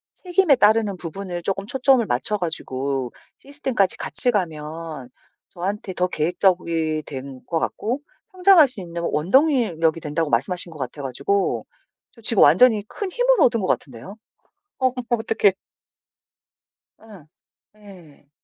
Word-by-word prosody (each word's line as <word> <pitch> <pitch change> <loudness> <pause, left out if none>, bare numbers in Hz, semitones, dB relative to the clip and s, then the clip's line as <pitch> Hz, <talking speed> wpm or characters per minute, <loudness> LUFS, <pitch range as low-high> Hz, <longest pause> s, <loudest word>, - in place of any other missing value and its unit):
책임에 360 -4 +2
따르는 215 -4 +3
부분을 175 0 -6
쪼끔 195 +1 -3
초점을 260 -1 +3
맞춰 130 +13 -1
가지고 135 -6 -2 0.2
시스템까지 265 -9 -1
같이 245 - +2
가면 160 - -4 0.4
저한테 190 +2 -5
더 180 0 0
계획적이 165 -2 0
된 135 -1 -8
것 165 -1 -1
같고 245 - -3 0.3
성장할 365 -5 +6
수 225 -6 -10
있는 170 -1 -6
원동이 245 - +2
력이 165 0 +1
된다고 150 0 -2
말씀하신 170 +9 -1
것 155 - -12
같아 135 +2 -6
가지고 140 +10 -1 0.4
저 230 - -19
지금 220 -2 +2
완전히 230 -5 +5
큰 400 -3 -5
힘을 - - +2
얻은 230 -2 +3
것 185 - -2
같은데요. 130 - -4 0.6
어머 255 -1 +1 0.2
어떡해. 220 -3 +2 1.5
예. 205 -9 -15 0.5
예. 175 -9 -17
185 Hz, 285 characters per minute, -22 LUFS, 155-230 Hz, 1.5 s, 성장할